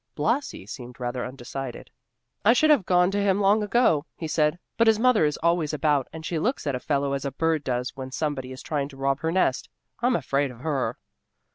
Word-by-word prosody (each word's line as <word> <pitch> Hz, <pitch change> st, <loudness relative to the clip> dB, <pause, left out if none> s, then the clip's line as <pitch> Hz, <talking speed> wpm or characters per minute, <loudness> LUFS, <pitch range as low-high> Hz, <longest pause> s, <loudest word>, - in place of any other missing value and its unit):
Blasi 160 Hz, -, -1 dB
seemed 125 Hz, +3 st, -9 dB
rather 125 Hz, 0 st, -3 dB
undecided. 130 Hz, 0 st, -7 dB, 0.5 s
"I 225 Hz, -, +6 dB
should 310 Hz, +5 st, +4 dB
have 260 Hz, -11 st, +3 dB
gone 180 Hz, 0 st, +4 dB
to 205 Hz, 0 st, 0 dB
him 200 Hz, -1 st, +2 dB
long 205 Hz, +2 st, +4 dB
ago," 205 Hz, -8 st, +2 dB
he 160 Hz, -, -4 dB
said, 155 Hz, +1 st, +1 dB, 0.2 s
"but 230 Hz, -, +3 dB
his 220 Hz, -1 st, +5 dB
mother 230 Hz, -6 st, +4 dB
is 150 Hz, -1 st, 0 dB
always 170 Hz, -3 st, +2 dB
about, 145 Hz, -2 st, +1 dB
and 160 Hz, 0 st, -8 dB
she 165 Hz, -1 st, -1 dB
looks 245 Hz, -, -1 dB
at 140 Hz, -, 0 dB
a 125 Hz, -, -2 dB
fellow 140 Hz, 0 st, 0 dB
as 140 Hz, -, -2 dB
a 140 Hz, -, -2 dB
bird 160 Hz, +2 st, 0 dB
does 125 Hz, -1 st, -2 dB
when 130 Hz, -1 st, -6 dB
somebody 135 Hz, -2 st, -3 dB
is 130 Hz, -, -9 dB
trying 145 Hz, -2 st, -2 dB
to 135 Hz, -, -13 dB
rob 135 Hz, 0 st, 0 dB
her 160 Hz, -, -1 dB
nest. 170 Hz, -7 st, +1 dB, 0.3 s
I'm 245 Hz, +1 st, +2 dB
afraid 140 Hz, -6 st, 0 dB
of 125 Hz, -1 st, -12 dB
her." 140 Hz, -3 st, -1 dB
150 Hz, 220 wpm, -25 LUFS, 135-190 Hz, 0.5 s, I